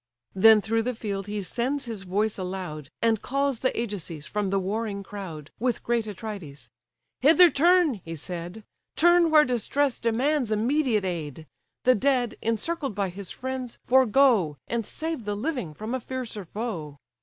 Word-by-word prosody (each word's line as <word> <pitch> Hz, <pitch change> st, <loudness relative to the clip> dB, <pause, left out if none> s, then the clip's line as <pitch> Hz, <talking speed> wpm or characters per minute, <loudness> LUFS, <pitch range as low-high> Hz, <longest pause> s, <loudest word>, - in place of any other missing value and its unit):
Then 215 Hz, +2 st, +7 dB
through 225 Hz, +2 st, 0 dB
the 250 Hz, +2 st, -2 dB
field 200 Hz, -3 st, -4 dB
he 205 Hz, -1 st, -3 dB
sends 255 Hz, +8 st, -2 dB
his 225 Hz, -4 st, -5 dB
voice 205 Hz, +3 st, 0 dB
aloud, 180 Hz, -6 st, -5 dB
And 225 Hz, -2 st, +2 dB
calls 275 Hz, -2 st, 0 dB
the 260 Hz, -, +2 dB
Ajaces 180 Hz, -9 st, -5 dB
from 205 Hz, -2 st, -2 dB
the 195 Hz, -, +1 dB
warring 200 Hz, +1 st, -2 dB
crowd, 175 Hz, -8 st, -8 dB
With 245 Hz, 0 st, -1 dB
great 235 Hz, -2 st, 0 dB
Atrides. 180 Hz, -, -8 dB, 0.5 s
"Hither 330 Hz, +5 st, +7 dB
turn, 330 Hz, -, +3 dB
(he 165 Hz, 0 st, -6 dB
said,) 175 Hz, +5 st, -7 dB, 0.3 s
Turn 345 Hz, 0 st, +5 dB
where 305 Hz, -1 st, +6 dB
distress 250 Hz, +2 st, 0 dB
demands 250 Hz, +2 st, +1 dB
immediate 230 Hz, -1 st, +1 dB
aid; 160 Hz, -4 st, -4 dB, 0.4 s
The 255 Hz, -, +6 dB
dead, 250 Hz, 0 st, +1 dB
encircled 265 Hz, -, -2 dB
by 200 Hz, -2 st, 0 dB
his 190 Hz, +1 st, -7 dB
friends, 260 Hz, -2 st, -5 dB
forego, 245 Hz, -, +4 dB
And 230 Hz, -2 st, -2 dB
save 320 Hz, -7 st, -4 dB
the 205 Hz, 0 st, -2 dB
living 245 Hz, -, -3 dB
from 215 Hz, +7 st, -5 dB
a 260 Hz, -, 0 dB
fiercer 240 Hz, -5 st, -5 dB
foe. 170 Hz, -8 st, -5 dB
220 Hz, 155 wpm, -26 LUFS, 195-260 Hz, 0.5 s, Then